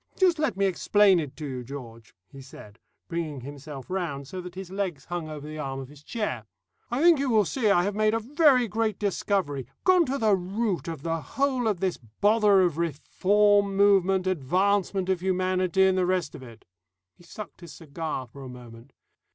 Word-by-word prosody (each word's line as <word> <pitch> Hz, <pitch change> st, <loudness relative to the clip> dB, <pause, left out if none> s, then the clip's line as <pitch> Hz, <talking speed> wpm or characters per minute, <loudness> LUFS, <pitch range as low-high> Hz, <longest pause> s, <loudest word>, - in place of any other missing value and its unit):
Just 360 Hz, -4 st, +3 dB
let 305 Hz, -9 st, 0 dB
me 200 Hz, -, +2 dB
explain 195 Hz, 0 st, +4 dB
it 150 Hz, -5 st, -5 dB
to 155 Hz, -, -6 dB
you, 130 Hz, -3 st, -5 dB
George," 115 Hz, -4 st, -10 dB
he 135 Hz, -, -12 dB
said, 115 Hz, -4 st, -13 dB, 0.3 s
bringing 160 Hz, -5 st, -4 dB
himself 140 Hz, 0 st, -9 dB
round 165 Hz, -8 st, -3 dB
so 185 Hz, +4 st, -6 dB
that 180 Hz, 0 st, -10 dB
his 190 Hz, -1 st, -8 dB
legs 190 Hz, -7 st, -3 dB
hung 175 Hz, -2 st, -5 dB
over 150 Hz, -1 st, -7 dB
the 155 Hz, 0 st, -7 dB
arm 135 Hz, -2 st, -4 dB
of 135 Hz, -1 st, -8 dB
his 145 Hz, -1 st, -15 dB
chair. 150 Hz, -, -4 dB, 0.4 s
"I 245 Hz, +6 st, -1 dB
think 340 Hz, -4 st, +6 dB
you 275 Hz, -1 st, 0 dB
will 215 Hz, -3 st, +4 dB
see 225 Hz, +2 st, 0 dB
I 175 Hz, -3 st, +4 dB
have 205 Hz, +2 st, -1 dB
made 215 Hz, +1 st, +2 dB
a -, -, +1 dB
very 260 Hz, 0 st, +3 dB
great 220 Hz, -1 st, -1 dB
discovery, 190 Hz, -, -1 dB, 0.2 s
gone 365 Hz, -3 st, +4 dB
to 270 Hz, +2 st, -1 dB
the 215 Hz, -5 st, +3 dB
root 195 Hz, +1 st, -2 dB
of 160 Hz, -4 st, -6 dB
the 165 Hz, -1 st, -2 dB
whole 265 Hz, -, -1 dB
of 200 Hz, -5 st, -1 dB
this 190 Hz, -2 st, 0 dB, 0.2 s
bother 210 Hz, -2 st, +4 dB
of 170 Hz, -3 st, +1 dB
reform 200 Hz, +5 st, +2 dB
movement, 195 Hz, -2 st, +4 dB
advancement 185 Hz, +4 st, +1 dB
of 190 Hz, -2 st, +1 dB
humanity, 185 Hz, 0 st, +1 dB
and 190 Hz, 0 st, +2 dB
the 180 Hz, -, +1 dB
rest 180 Hz, -5 st, 0 dB
of -, -, -10 dB
it." 115 Hz, -3 st, -13 dB, 0.5 s
He -, -, -21 dB
sucked 205 Hz, +4 st, -10 dB
his 170 Hz, -4 st, -10 dB
cigar 155 Hz, -3 st, -5 dB
for 135 Hz, +3 st, -13 dB
a 130 Hz, -, -8 dB
moment. 120 Hz, 0 st, -13 dB
185 Hz, 200 wpm, -26 LUFS, 145-205 Hz, 0.5 s, think